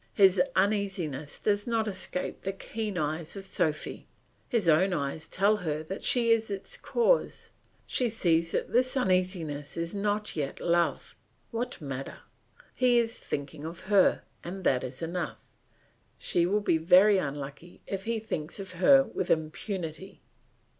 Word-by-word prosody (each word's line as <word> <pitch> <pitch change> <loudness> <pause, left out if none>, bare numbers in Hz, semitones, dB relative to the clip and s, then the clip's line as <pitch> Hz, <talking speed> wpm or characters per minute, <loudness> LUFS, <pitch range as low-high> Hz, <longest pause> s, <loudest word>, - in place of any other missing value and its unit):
His 190 -3 +6
uneasiness 185 -8 -1
does 205 0 0
not 225 -2 +1
escape 185 -2 -3
the 195 - -3
keen 210 0 -4
eyes 155 +2 -2
of 195 -1 -7
Sophy; 160 -7 -2 0.4
his 230 -8 +1
own 180 +4 +4
eyes 150 +1 -3
tell 205 +3 +2
her 155 -5 -3
that 190 +5 -6
she 235 -2 +3
is 225 -1 +2
its 195 -1 -5
cause; 485 +1 +1 0.3
she 250 -2 +1
sees 170 -6 +2
that - - -2
this 255 +2 +2
uneasiness 180 - 0
is 170 +2 -3
not 205 +1 -1
yet 145 -3 -3
love; 170 0 +1 0.4
what 245 +2 -3
matter? 135 -3 -6 0.6
He 250 -1 +3
is 230 0 +1
thinking 145 +1 -5
of 165 +2 -7
her, 195 -1 +3 0.2
and 185 +2 -6
that 125 -6 +2
is 130 +5 -6
enough; 170 +2 -3 0.8
she 175 0 +1
will 205 +3 +1
be 165 -5 +2
very 190 +5 +6
unlucky 145 +3 -6
if 195 -1 -4
he 230 0 0
thinks 160 -6 -4
of 195 -1 -6
her 270 +10 +6
with 185 -8 -4
impunity. 165 +2 -3
185 Hz, 150 wpm, -29 LUFS, 160-210 Hz, 0.8 s, His